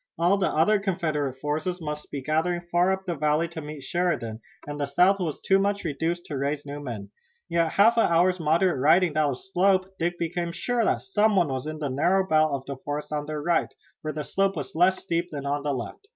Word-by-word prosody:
All 180 Hz, +4 st, +3 dB
the 190 Hz, -, +2 dB
other 205 Hz, +7 st, +3 dB
Confederate 160 Hz, -9 st, -1 dB
forces 155 Hz, +6 st, -2 dB
must 150 Hz, -2 st, -6 dB
be 140 Hz, -2 st, -5 dB
gathering 160 Hz, +4 st, 0 dB
far 175 Hz, +2 st, +3 dB
up 190 Hz, 0 st, -2 dB
the 175 Hz, -, -1 dB
valley 150 Hz, +2 st, +1 dB
to 165 Hz, -1 st, -7 dB
meet 150 Hz, -2 st, -8 dB
Sheridan, 130 Hz, -9 st, -1 dB, 0.2 s
and 145 Hz, 0 st, -6 dB
the 145 Hz, -, -1 dB
South 180 Hz, +7 st, +3 dB
was 165 Hz, -5 st, -3 dB
too 195 Hz, 0 st, +3 dB
much 200 Hz, +1 st, 0 dB
reduced 165 Hz, +3 st, -2 dB
to 145 Hz, -, -5 dB
raise 145 Hz, +1 st, -2 dB
new 145 Hz, 0 st, -6 dB
men. 110 Hz, -8 st, -7 dB, 0.4 s
Yet 170 Hz, -1 st, +2 dB
after -, -, -6 dB
a -, -, -10 dB
half 230 Hz, +2 st, +5 dB
hour's 180 Hz, +2 st, +3 dB
moderate 165 Hz, 0 st, +2 dB
riding 165 Hz, +4 st, +4 dB
down 150 Hz, -2 st, +2 dB
the -, -, -5 dB
slope 190 Hz, +3 st, +1 dB
Dick 175 Hz, +1 st, -1 dB
became 170 Hz, 0 st, -2 dB
sure 245 Hz, +5 st, 0 dB
that -, -, +1 dB
some 210 Hz, +2 st, +2 dB
one 175 Hz, -5 st, +3 dB
was 130 Hz, +2 st, -3 dB
in 155 Hz, 0 st, -4 dB
the 150 Hz, -2 st, -3 dB
narrow 180 Hz, +8 st, +2 dB
belt 155 Hz, -5 st, +2 dB
of 140 Hz, -1 st, -6 dB
forest 150 Hz, +1 st, -4 dB
on 150 Hz, -1 st, -2 dB
their 155 Hz, -1 st, -4 dB
right, 170 Hz, +1 st, +1 dB, 0.3 s
where 155 Hz, -, -3 dB
the 150 Hz, 0 st, -4 dB
slope 195 Hz, +3 st, 0 dB
was 145 Hz, -4 st, -5 dB
less 180 Hz, +3 st, +3 dB
steep 170 Hz, +1 st, -2 dB
than 145 Hz, -3 st, -6 dB
on 145 Hz, +1 st, -1 dB
their 145 Hz, 0 st, -1 dB
left. 115 Hz, -7 st, -6 dB
160 Hz, 230 wpm, -26 LUFS, 145-180 Hz, 0.4 s, half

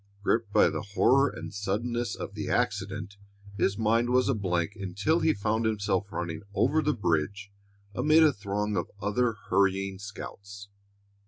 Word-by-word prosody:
Gripped 110 Hz, 0 st, +1 dB
by -, -, +5 dB
the -, -, -3 dB
horror 130 Hz, +7 st, +3 dB
and -, -, -8 dB
suddenness 110 Hz, +4 st, -2 dB
of -, -, -7 dB
the -, -, -4 dB
accident, 100 Hz, 0 st, -1 dB, 0.4 s
his 100 Hz, 0 st, +1 dB
mind 115 Hz, +2 st, +2 dB
was 125 Hz, +1 st, +3 dB
a 135 Hz, -, +3 dB
blank 90 Hz, -3 st, -1 dB
until 100 Hz, -, 0 dB
he 160 Hz, -, +3 dB
found 110 Hz, +1 st, -1 dB
himself 100 Hz, -2 st, -1 dB
running 85 Hz, -1 st, -4 dB
over 155 Hz, +7 st, +3 dB
the 150 Hz, 0 st, 0 dB
bridge 100 Hz, +2 st, -1 dB, 0.4 s
amid 155 Hz, +7 st, +4 dB
a 155 Hz, -2 st, +5 dB
throng 105 Hz, 0 st, -2 dB
of 85 Hz, -, -2 dB
other 110 Hz, +4 st, +1 dB, 0.2 s
hurrying 95 Hz, 0 st, +1 dB
scouts. 100 Hz, 0 st, -9 dB
100 Hz, 155 wpm, -28 LUFS, 100-120 Hz, 0.4 s, by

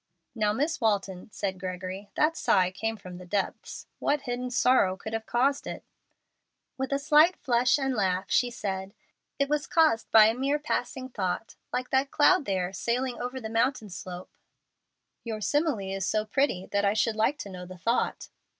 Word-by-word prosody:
"Now, 215 Hz, -3 st, +1 dB
Miss 290 Hz, +7 st, -1 dB
Walton," 200 Hz, -3 st, 0 dB
said 190 Hz, -2 st, -3 dB
Gregory, 185 Hz, +2 st, -5 dB
"that 310 Hz, +2 st, +2 dB
sigh 185 Hz, -, +2 dB
came 225 Hz, +4 st, -3 dB
from 180 Hz, -3 st, -10 dB
the 180 Hz, -, -10 dB
depths. 200 Hz, +1 st, -3 dB
What 290 Hz, 0 st, +1 dB
hidden 250 Hz, -1 st, -3 dB
sorrow 245 Hz, -6 st, +3 dB
could 220 Hz, -, -7 dB
have 225 Hz, 0 st, -3 dB
caused 270 Hz, +4 st, +1 dB
it?" -, -, -6 dB, 0.9 s
With 265 Hz, 0 st, -3 dB
a 275 Hz, -, +2 dB
slight 300 Hz, +5 st, +5 dB
flush 245 Hz, +2 st, +2 dB
and 270 Hz, -2 st, -1 dB
laugh, 190 Hz, -4 st, 0 dB
she 245 Hz, -, +3 dB
said, 195 Hz, -3 st, -5 dB, 0.4 s
"It 280 Hz, -, +1 dB
was 295 Hz, 0 st, -1 dB
caused 315 Hz, -9 st, +3 dB
by 220 Hz, -1 st, +8 dB
a 220 Hz, -, +3 dB
mere 270 Hz, +4 st, 0 dB
passing 275 Hz, -3 st, -3 dB
thought, 195 Hz, -2 st, -3 dB, 0.2 s
like 250 Hz, 0 st, -3 dB
that 270 Hz, +1 st, +2 dB
cloud 310 Hz, +2 st, +4 dB
there 185 Hz, -1 st, -1 dB
sailing 240 Hz, +6 st, -2 dB
over 250 Hz, +2 st, -4 dB
the 225 Hz, -, -5 dB
mountain 225 Hz, -1 st, 0 dB
slope." 180 Hz, 0 st, -8 dB, 0.9 s
"Your 225 Hz, -2 st, -4 dB
simile 290 Hz, +4 st, +1 dB, 0.2 s
is 195 Hz, -, -3 dB
so 215 Hz, +2 st, 0 dB
pretty 215 Hz, -5 st, 0 dB
that 200 Hz, 0 st, +1 dB
I 200 Hz, +1 st, +2 dB
should 220 Hz, 0 st, +1 dB
like 225 Hz, +7 st, +1 dB
to 205 Hz, -, -7 dB
know 180 Hz, -1 st, -8 dB
the 185 Hz, 0 st, -10 dB
thought." 230 Hz, +8 st, -1 dB
225 Hz, 180 wpm, -28 LUFS, 195-270 Hz, 0.9 s, by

